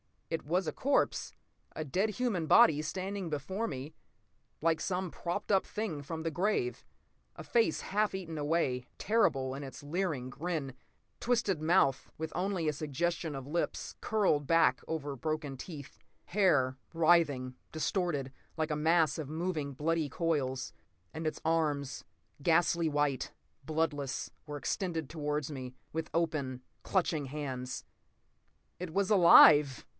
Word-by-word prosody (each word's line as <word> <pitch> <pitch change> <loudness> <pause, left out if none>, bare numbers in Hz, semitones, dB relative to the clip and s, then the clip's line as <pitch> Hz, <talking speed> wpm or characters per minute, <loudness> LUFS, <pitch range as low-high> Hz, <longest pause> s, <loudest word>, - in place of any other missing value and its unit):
It 165 - -2
was 175 +5 +1
a 155 - -1
corpse, 280 - 0 0.4
a 155 - -3
dead 190 +9 0
human 210 -9 -1
body, 150 -1 +6
standing 190 +3 -4
before 190 +9 -2
me 135 +2 -6 0.7
like 160 0 +2
some 185 -2 -2
propped 180 +5 -3
up 195 -1 +4
thing 210 -9 -4
from 160 +3 -5
the 165 - -1
grave. 175 - -1 0.5
A - - -8
face 225 -9 +2
half 210 0 0
eaten 165 -4 -5
away, 145 -5 0
terrible 135 -12 +2
in 135 - -5
its 140 +1 -9
leering 150 -5 -2
grin. 150 -1 -3 0.5
Twisted 220 -9 +1
mouth, 155 -5 +3
with 160 0 -4
only 180 -2 -1
a 150 - +2
suggestion 155 +2 -2
of 135 -1 -6
lips, 165 +5 -2
curled 190 -10 +1
back 165 0 +4
over 145 -3 -3
broken 155 +1 -3
teeth. 145 -1 -9 0.3
Hair—writhing, 155 -5 +2 0.2
distorted—like 155 -2 -2
a - - +1
mass 160 0 +3
of 145 -3 -5
moving, 155 -3 -2
bloody 160 +3 0
coils. 140 - -1 0.4
And 160 0 -3
its 155 - -3
arms, 150 -4 0 0.4
ghastly 170 +1 +3
white, 145 -3 0 0.3
bloodless, 150 -3 -1 0.2
were 145 0 -4
extended 165 -1 -2
toward 150 -2 -2
me, 130 -3 -7 0.2
with 160 0 -3
open, 150 -6 -1 0.2
clutching 165 -6 0
hands. 130 -3 -5 1.0
It 175 -3 -5
was 195 0 +1
alive! 150 - +8
160 Hz, 135 wpm, -32 LUFS, 140-175 Hz, 1.0 s, alive